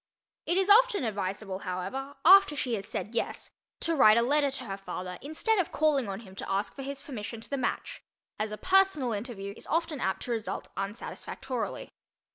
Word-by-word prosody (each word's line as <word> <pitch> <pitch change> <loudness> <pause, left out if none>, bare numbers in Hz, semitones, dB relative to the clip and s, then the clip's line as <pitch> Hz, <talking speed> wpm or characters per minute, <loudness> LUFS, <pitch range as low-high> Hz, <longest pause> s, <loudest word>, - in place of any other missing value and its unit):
It 345 - +2
is 385 0 +3
often 425 - +6
advisable, 195 -2 -3
however, 195 +10 -4
after 380 -4 +8
she 255 -4 -1
has 200 -3 -3
said 215 - -4
"yes," 230 - -3 0.3
to 330 - +1
write 215 -6 +7
a 235 - +4
letter 285 +3 +3
to 265 -1 -6
her 195 -5 -4
father 180 -2 -6
instead 350 +9 0
of 360 - 0
calling 285 -7 +2
on 195 +2 -5
him 190 -5 -13
to - - -5
ask 200 +1 0
for 275 - -8
his 275 0 -5
permission 230 -4 -6
to 225 - -11
the - - +1
match, 390 - -3 0.4
as 215 0 -1
a 215 - -4
personal 370 - +3
interview 205 -2 -5
is - - -10
often 325 -2 0
apt 190 - -1
to 245 - -4
result 225 -2 -3
unsatisfactorily. 200 +3 -5
245 Hz, 195 wpm, -29 LUFS, 200-305 Hz, 0.4 s, after